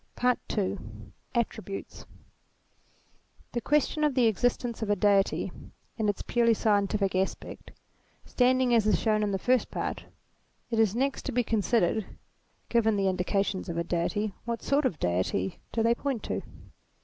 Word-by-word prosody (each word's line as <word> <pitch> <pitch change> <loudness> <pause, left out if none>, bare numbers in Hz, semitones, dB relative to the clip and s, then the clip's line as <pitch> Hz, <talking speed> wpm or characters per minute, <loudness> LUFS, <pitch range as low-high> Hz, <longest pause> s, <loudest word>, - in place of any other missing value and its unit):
PAET 250 0 +2 0.2
II 200 -1 0 0.6
ATTBIBTJTES 205 -4 -3 1.6
question 300 +1 +1
of 295 -3 +2
the 250 -3 +4
existence 235 +2 0
of 220 - -2
a 205 - +3
Deity, 200 0 +2 0.4
in 215 -2 0
its 205 - -2
purely 230 -1 +3
scientific 200 -2 +1
aspect, 190 +1 -3 0.6
standing 255 0 +2
as 225 -3 +4
is - - +3
shown 215 -2 +2
in 210 - +1
the 195 - 0
First 250 +6 +1
Part, - - -4 0.7
it 225 - +1
is 220 -2 +3
next 270 +3 0
to - - -1
be 245 +1 +1
considered, 220 -2 0 0.5
given 225 -2 +2
the 195 -1 +2
indications 190 +1 -1
of 170 - -3
a 170 - 0
Deity, 195 +5 -1
what 235 -1 -4
sort 280 +1 +2
of 225 - +1
a - - -27
Deity 90 0 -1
do 225 - 0
they 230 +1 +4
point 260 -2 -3
to - - -2
220 Hz, 155 wpm, -28 LUFS, 195-240 Hz, 1.6 s, the